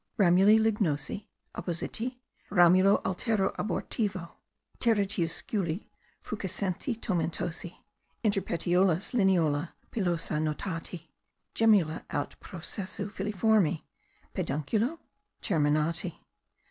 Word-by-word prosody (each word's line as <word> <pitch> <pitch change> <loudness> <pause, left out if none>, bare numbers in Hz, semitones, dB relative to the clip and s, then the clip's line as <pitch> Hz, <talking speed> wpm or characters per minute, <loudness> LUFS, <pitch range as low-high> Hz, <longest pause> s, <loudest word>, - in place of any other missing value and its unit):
"Ramuli 195 +2 +6
lignosi, 205 -5 0 0.3
oppositi, 225 +8 -3 0.3
ramulo 185 +1 +5
altero 195 +1 0
abortivo, 195 -2 -2 0.5
teretiusculi, 195 -4 0 0.4
fuscescenti 205 - -3
tomentosi, 175 -3 -2 0.5
inter 205 -3 +2
petiolos 180 +2 +1
lineola 170 -8 +2 0.2
pilosa 175 -7 -1
notati, 165 +1 -4 0.4
gemmula 200 -8 +3
aut - - -3
processu 185 +3 -5
filiformi 200 -4 +2 0.5
(pedunculo?) 220 - -1 0.4
terminati. 155 0 +1
185 Hz, 70 wpm, -29 LUFS, 165-210 Hz, 0.5 s, Ramuli